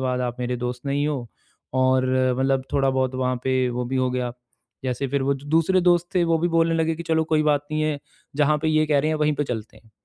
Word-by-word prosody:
बाद 125 -1 -1
आप 125 -1 -2
मेरे 125 0 -1
दोस्त 125 0 -4
नहीं 145 +1 0
हो 130 -5 -3 0.6
और 130 0 +3 0.3
मतलब 135 0 +1
थोड़ा-बहुत 130 -2 +1
वहाँ 130 -1 0
पे 130 -1 +1
वो 125 +1 -3
भी 130 +1 -2
हो 130 -1 +1
गया। 125 -1 -2 0.5
जैसे 130 +2 -1
फिर 140 0 0
वो 140 +1 +1
दूसरे 160 +6 +1
दोस्त 175 0 +3
थे, 175 -2 +3
वो 165 -1 +2
भी 175 +2 +1
बोलने 165 0 +2
लगे 165 0 +1
कि 170 - -6
चलो 160 -1 +1
कोई 155 -1 +1
बात 145 -1 +2
नहीं 155 0 0
है, 155 -2 0 0.4
जहाँ 150 0 +3
पे 160 - +1
ये 155 0 +2
कह 145 -2 +2
रहे 155 - 0
हैं 155 - 0
वहीं 150 0 +2
पे 145 - -1
चलते 110 -5 -6
हैं। 110 -1 -25
140 Hz, 245 wpm, -23 LUFS, 130-155 Hz, 0.6 s, और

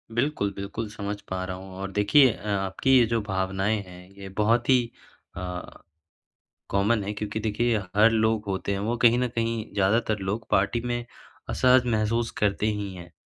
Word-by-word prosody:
बिल्कुल, 120 -6 0
बिल्कुल 100 +3 -5
समझ 105 -1 -5
पा 95 0 -2
रहा 95 - -5
हूँ 95 0 -11
और 95 0 -5
देखिए 110 +6 +5
अ, 105 - -10
आपकी 100 +7 +2
ये 120 - +6
जो 115 0 0
भावनाएँ 95 +1 -1
हैं 90 +1 -13
ये 95 -1 -8
बहुत 115 +4 +2
ही 125 -2 +5 0.5
अ, 90 -1 -6 1.0
कॉमन 100 +2 +2
है 105 - -3
क्योंकि 105 +1 -4
देखिए 110 +2 +1 0.2
हर 105 +2 +6
लोग 110 -1 +1
होते 95 0 -2
हैं 100 - -1
वो 110 +4 -1
कहीं 120 0 +5
न 125 - +1
कहीं 115 -1 -2
ज़्यादातर 105 +2 +1
लोग 100 +4 -3
पार्टी 100 +5 +2
में 120 -1 -2 0.4
असहज 130 0 +4
महसूस 115 0 0
करते 105 0 +1
ही 105 -3 -2
हैं 85 -1 -11
105 Hz, 175 wpm, -26 LUFS, 100-115 Hz, 1.0 s, ये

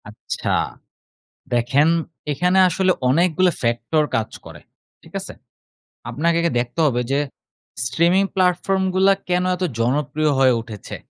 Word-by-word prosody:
আচ্ছা, 105 - -6 1.0
দেখেন 125 +6 +3 0.4
এখানে 180 +6 +1
আসলে 185 +1 +2 0.2
অনেকগুলো 175 +5 +3
ফ্যাক্টর 120 +6 +1
কাজ 110 -1 -2 0.2
করে, - - -11 0.4
ঠিক - - -18
আছে? - - -7 0.8
আপনাকে 170 +3 0 0.2
দেখতে 120 +6 -4
হবে 125 -4 +1
যে 140 - +2 0.7
স্ট্রিমিং 170 +9 +2
প্লাটফর্মগুলা 190 +1 +2 0.2
কেন 180 0 +1
এত 180 - -5 0.2
জনপ্রিয় 145 +5 0
হয়ে 130 -1 +5
উঠেছে। 110 -3 -9
155 Hz, 115 wpm, -21 LUFS, 125-180 Hz, 1.0 s, হয়ে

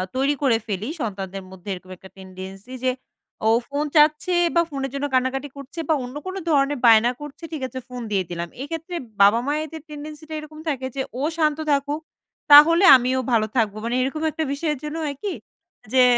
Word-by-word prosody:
তৈরি 275 +2 +2
করে 255 -5 +3
ফেলি, 205 +4 -3
সন্তানদের 195 -3 -4
মধ্যে 190 +1 -10
এরকম 185 0 -10
একটা 190 - -14
tendency 190 +5 -10
যে, 255 - +3 0.6
ও - - +5 0.2
ফোন 285 +1 -2
চাচ্ছে 305 +4 +4 0.2
বা 340 - +6
ফোনের 270 -2 -3
জন্য 280 +1 -2
কান্নাকাটি 260 +2 0
করছে 280 +5 -9
বা 315 - +5
অন্য 250 +2 -8
কোনো 375 +1 -4
ধরনের 280 -2 +2
বায়না 230 +1 +6
করছে? 295 +3 -10
ঠিক 310 -4 -5
আছে 260 0 -7
ফোন 250 -1 -7
দিয়ে 195 -2 +1
দিলাম। 170 0 -4
এইক্ষেত্রে 330 +4 -5 0.3
বাবা-মায়েদের 290 +9 +2
tendency 300 +1 -8
টা - - -6
এরকম 305 0 -11
থাকে 265 -3 -2
যে, 270 - -1 0.2
ও - - -2 0.2
শান্ত 305 -2 +2
থাকুক, 285 +2 0 0.5
তাহলে 330 +5 +9
আমিও 255 +1 +1
ভালো 220 -2 +3
থাকব। 215 -4 +2
মানে 235 +1 -1
এরকম 275 +4 -2
একটা 320 - -2
বিষয়ের 300 +1 -1
জন্য 300 +1 -4
হয় 290 -2 -3
কি 400 - -1 0.6
যে, 255 - +6
275 Hz, 185 wpm, -23 LUFS, 230-300 Hz, 0.6 s, তাহলে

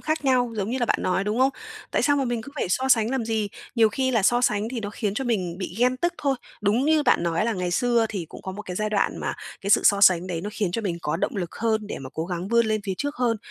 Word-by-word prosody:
khác 310 -1 -2
nhau, 250 -3 +2
giống 205 +2 -2
như 260 - -1
là 240 - 0
bạn - - +2
nói, 190 +1 0
đúng 210 +3 -1
không? 265 +1 +4 0.4
Tại - - +1
sao 285 -1 +3
mà 275 - +1
mình 240 -2 -2
cứ 280 - -11
phải 285 - -1
so 260 +8 0
sánh 230 -2 +4
làm 265 -4 -1
gì? 220 -2 -1 0.3
Nhiều 225 -2 +5
khi 260 +4 -1
là 225 -5 +2
so 240 +4 +4
sánh 215 -2 +1
thì 245 -2 -4
nó 205 -1 -4
khiến 210 -2 -2
cho 265 - -2
mình 185 -7 -1
bị 185 -2 -5
ghen 250 +1 +3
tức 345 +6 0
thôi. 275 -2 +1 0.3
Đúng 215 +6 +2
như 310 -1 +3
bạn 245 -9 +3
nói 170 +2 0
là 230 - +1
ngày 180 -2 -2
xưa 235 +3 +2
thì 185 -6 -4
cũng - - -11
có 190 - -5
một 210 +2 -7
cái 180 -2 -6
giai 215 0 -1
đoạn 205 - +1
mà - - -3 0.3
cái 200 - -3
sự - - +6
so 200 -1 +5
sánh 185 -2 +5
đấy, 170 -3 -3
nó 205 - -5
khiến 200 -5 -1
cho 225 - -2
mình 175 -4 -2
có 150 - -1
động 205 +5 -2
lực 175 -3 -4
hơn 220 -2 0
để - - -5
mà 135 -1 -8
cố 160 - -2
gắng 180 +1 -4
vươn 235 -1 +3
lên 215 -1 0
phía 195 - -2
trước 285 0 -3
hơn. 240 -3 +1
220 Hz, 310 wpm, -24 LUFS, 195-245 Hz, 0.4 s, sự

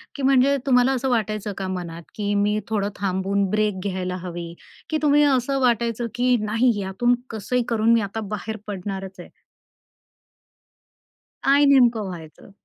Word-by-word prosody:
की 280 - -5
म्हणजे 270 +1 +4
तुम्हाला 250 -1 +4
असं 265 0 -1
वाटायचं 215 -3 -1
का 190 - -3
मनात 170 -2 -8
की 205 -1 -2
मी 205 +1 +1
थोडं 205 -2 0
थांबून 195 +1 0
ब्रेक 210 -1 0
घ्यायला 185 -2 -3
हवी 170 -1 -6 0.4
की 315 - 0
तुम्ही 295 -1 +4
असं 275 -1 +2
वाटायचं 235 -1 +1
की 250 0 +3
नाही 225 +4 +2
यातून 195 +6 +1
कसंही 230 +3 -1
करून 230 0 +3
मी 230 - +3
आता 200 +2 -4 0.2
बाहेर 220 +1 -6
पडणारचय? 190 -2 -6 2.2
काय 280 +1 +5
नेमकं 240 -6 +4
व्हायचं? 165 +1 -11
215 Hz, 140 wpm, -23 LUFS, 195-250 Hz, 2.2 s, काय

